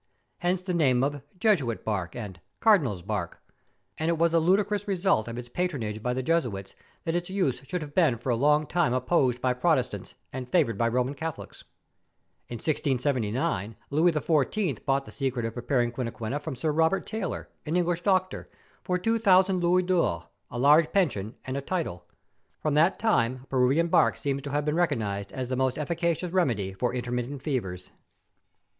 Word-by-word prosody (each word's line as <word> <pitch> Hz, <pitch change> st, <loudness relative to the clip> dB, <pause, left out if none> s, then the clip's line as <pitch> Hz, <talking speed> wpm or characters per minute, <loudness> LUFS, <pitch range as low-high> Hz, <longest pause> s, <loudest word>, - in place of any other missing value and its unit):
Hence 180 Hz, +1 st, 0 dB
the 185 Hz, -1 st, -2 dB
name 130 Hz, -7 st, +3 dB
of 140 Hz, +1 st, +1 dB
^ 145 Hz, -, -8 dB, 0.2 s
Jesuit's 160 Hz, -, +1 dB
bark,' 95 Hz, -5 st, -2 dB
and 105 Hz, -7 st, -7 dB
' -, -, -49 dB
Cardinal's 145 Hz, -, +3 dB
bark 100 Hz, -3 st, -4 dB, 0.3 s
;' -, -, -46 dB
and 160 Hz, +1 st, 0 dB
it 170 Hz, -, +1 dB
was 170 Hz, +1 st, +2 dB
a 165 Hz, -, +5 dB
ludicrous 200 Hz, +4 st, +1 dB
result 190 Hz, -, +1 dB
of 115 Hz, 0 st, -5 dB
its 120 Hz, 0 st, -6 dB
patronage 120 Hz, -9 st, -3 dB
by 125 Hz, -, -1 dB
the 130 Hz, +1 st, -2 dB
Jesuits 120 Hz, -, -1 dB, 0.3 s
that 165 Hz, -, -1 dB
its 175 Hz, +1 st, -2 dB
use 185 Hz, -10 st, 0 dB
should 180 Hz, -3 st, -3 dB
have 145 Hz, -1 st, -10 dB
been 155 Hz, -9 st, +3 dB
for 120 Hz, +3 st, -2 dB
a -, -, +2 dB
lono^ 150 Hz, +4 st, +3 dB
time 170 Hz, -8 st, +1 dB
opposed 130 Hz, -1 st, +2 dB
by 130 Hz, -1 st, +2 dB
Protestants 125 Hz, -, 0 dB, 0.2 s
and 125 Hz, -1 st, -5 dB
favoured 145 Hz, -, +2 dB
by 115 Hz, +3 st, +1 dB
Koman 125 Hz, +3 st, 0 dB
Catholics. 160 Hz, +1 st, -7 dB, 0.8 s
In 120 Hz, -, -5 dB
1679 125 Hz, -, -1 dB, 0.2 s
Louis 160 Hz, +5 st, +4 dB
XIV. 155 Hz, -, 0 dB
bought 135 Hz, 0 st, +1 dB
the -, -, -11 dB
secret 130 Hz, -4 st, -2 dB
of 115 Hz, -, -3 dB
preparing 120 Hz, 0 st, 0 dB
quinquina 120 Hz, +2 st, -4 dB
from 150 Hz, -2 st, -5 dB
Sir 150 Hz, +5 st, -1 dB
Robert 160 Hz, +5 st, +2 dB
Taylor, 220 Hz, -5 st, -4 dB, 0.2 s
an 155 Hz, -, -1 dB
English 175 Hz, -1 st, +1 dB
doctor, 185 Hz, -1 st, 0 dB, 0.3 s
for 180 Hz, -, -1 dB
two 225 Hz, +5 st, 0 dB
thousand 190 Hz, -3 st, +4 dB
louis 180 Hz, +1 st, +3 dB
d'ors, 170 Hz, -, +1 dB, 0.3 s
a 120 Hz, -, -6 dB
large 150 Hz, +5 st, +5 dB
pension, 120 Hz, -, 0 dB
and 130 Hz, -, -4 dB
a 140 Hz, -, -2 dB
title. 160 Hz, -, -3 dB, 0.5 s
From 155 Hz, -, -1 dB
that 160 Hz, +6 st, +4 dB
time 130 Hz, -, +1 dB
Peruvian 135 Hz, +6 st, +3 dB
bark -, -, +3 dB
seems 140 Hz, -1 st, -2 dB
to 140 Hz, -, -6 dB
have 145 Hz, +1 st, -1 dB
been 150 Hz, -, +1 dB
recognised 110 Hz, -, -1 dB
as 130 Hz, -1 st, -4 dB
the 130 Hz, -, 0 dB
most 130 Hz, 0 st, 0 dB
efficacious 170 Hz, +3 st, -1 dB
remedy 115 Hz, -, 0 dB
for 110 Hz, +6 st, -1 dB
intermittent 125 Hz, +2 st, -3 dB
fevers. 105 Hz, -, -3 dB
140 Hz, 185 wpm, -27 LUFS, 120-170 Hz, 0.8 s, a